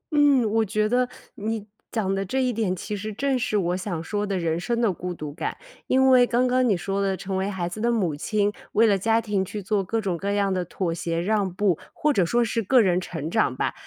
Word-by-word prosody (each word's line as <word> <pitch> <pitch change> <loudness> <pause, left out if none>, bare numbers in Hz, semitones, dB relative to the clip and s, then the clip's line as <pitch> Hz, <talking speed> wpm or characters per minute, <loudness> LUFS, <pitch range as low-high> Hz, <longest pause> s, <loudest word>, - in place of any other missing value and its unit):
嗯， 285 -5 +5
我 225 +1 +3
觉 215 +1 0
得 245 +2 +1 0.3
你 220 0 -3 0.3
讲 200 -4 0
的 195 0 -1
这 260 +8 -1
一 250 -1 +1
点 210 -5 0
其 210 +3 -5
实 215 +2 -5
正 270 +4 0
是 220 -3 0
我 180 -2 0
想 180 -4 -4
说 205 +4 -2
的 195 -1 -1
人 165 -1 -1
生 235 +6 -1
的 225 -5 +2
孤 180 +1 -5
独 150 -4 -6
感。 - - -4 0.3
因 265 0 +4
为 245 -1 +6
刚 245 +1 +2
刚 255 0 +2
你 200 - +3
说 195 +2 -2
的 195 -1 0
成 190 0 -4
为 190 +1 -1
孩 185 -3 -3
子 195 +5 -6
的 235 +1 +2
母 190 -10 0
亲， 205 +6 0 0.2
为 225 - +5
了 210 -3 +4
家 225 +3 +2
庭 210 -4 -1
去 205 +2 -6
做 200 +1 0
各 225 +5 -1
种 195 -5 -1
各 195 +4 -2
样 200 -1 +1
的 185 -1 0
妥 175 0 -2
协 165 0 -2
让 200 +1 0
步， 185 -2 +1
或 300 -1 +1
者 195 - +3
说 240 +5 +2
是 230 +1 -1
个 255 +5 +4
人 185 -5 +3
成 160 -3 -5
长 220 - +2
吧， - - -1
205 Hz, 270 characters per minute, -24 LUFS, 185-230 Hz, 0.3 s, 为